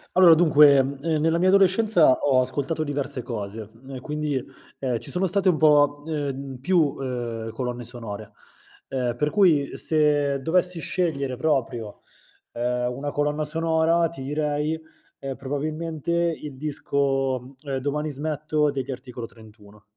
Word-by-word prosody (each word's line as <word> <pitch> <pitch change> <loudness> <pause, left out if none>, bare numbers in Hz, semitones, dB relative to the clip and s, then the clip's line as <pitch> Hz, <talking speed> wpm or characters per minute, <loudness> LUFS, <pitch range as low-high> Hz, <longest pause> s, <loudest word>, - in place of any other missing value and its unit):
Allora, 180 -3 +8
dunque, 150 -3 +6
ehm, 135 +1 +1 0.2
nella 165 +1 +2
mia 185 +2 +3
adolescenza 195 -4 +5
ho 130 -2 +2
ascoltato 145 +5 -2
diverse 140 -3 -2
cose, 105 -2 -6 0.2
ehm, 135 -1 -7
quindi, 150 -3 -2 0.4
ehm, 125 -3 -1
ci - - -7
sono 185 +1 +1
state 190 +1 +2
un 170 - +2
po', 145 -1 +4
ehm, 140 -3 -4
più, 155 -1 +2
ehm, 120 -4 -4
colonne 125 +1 -4
sonore, 115 -3 -7 0.6
ehm, 125 -3 -2
per 150 +5 0
cui 165 -7 +3
se 145 -3 +1
dovessi 180 +3 +1
scegliere 140 -8 -2
proprio, 120 -7 -1 0.5
ehm, 125 +1 -1
una 140 +3 -4
colonna 150 +1 -1
sonora 165 +1 +2
ti 135 -6 -9
direi, 150 +2 -1 0.4
ehm, 135 -1 -5
probabilmente 155 +4 -4
il 170 -4 -1
disco, 135 -3 -1
ehm, 140 -3 -3
"Domani 150 +3 -2
smetto" 150 +1 -1
degli 135 -1 -4
Articolo 125 -2 -7
31. 105 -2 -17
145 Hz, 140 wpm, -24 LUFS, 130-155 Hz, 0.6 s, Allora